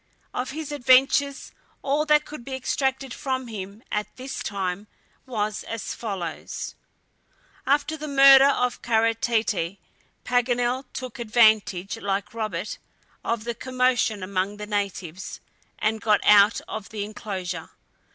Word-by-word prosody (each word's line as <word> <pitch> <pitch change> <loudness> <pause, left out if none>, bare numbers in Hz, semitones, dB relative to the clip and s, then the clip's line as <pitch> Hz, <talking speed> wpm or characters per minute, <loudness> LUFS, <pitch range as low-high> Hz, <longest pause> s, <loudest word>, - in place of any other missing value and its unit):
Of 255 - -2
his 300 +1 -5
adventures 275 +1 +3 0.3
all 295 +3 +1
that 300 0 +4
could 300 -5 -9
be 265 +1 -5
extracted 265 0 -1
from 260 -2 -2
him 205 -1 -8
at 210 0 -1
this 260 +1 -6
time 195 0 -3 0.4
was 215 -4 -2
as 225 -3 -4
follows: 195 -8 -5 0.9
After 290 +3 +2
the 305 0 -6
murder 275 -1 +8
of 250 -3 +1
Kara 230 0 +2
Tete, 220 -6 0 0.5
Paganel 245 +1 +1
took 255 -4 -7
advantage, 215 -4 +3
like 200 0 -2
Robert, 220 -2 -4 0.4
of 230 -1 -1
the 235 +1 -3
commotion 250 -4 +1
among 195 +2 -2
the 210 - -6
natives, 195 -4 -4 0.4
and 220 0 0
got 210 -1 +3
out 210 +1 +6
of 215 -2 -6
the 210 -2 -4
inclosure. 200 -4 -5
230 Hz, 130 wpm, -25 LUFS, 205-260 Hz, 0.9 s, murder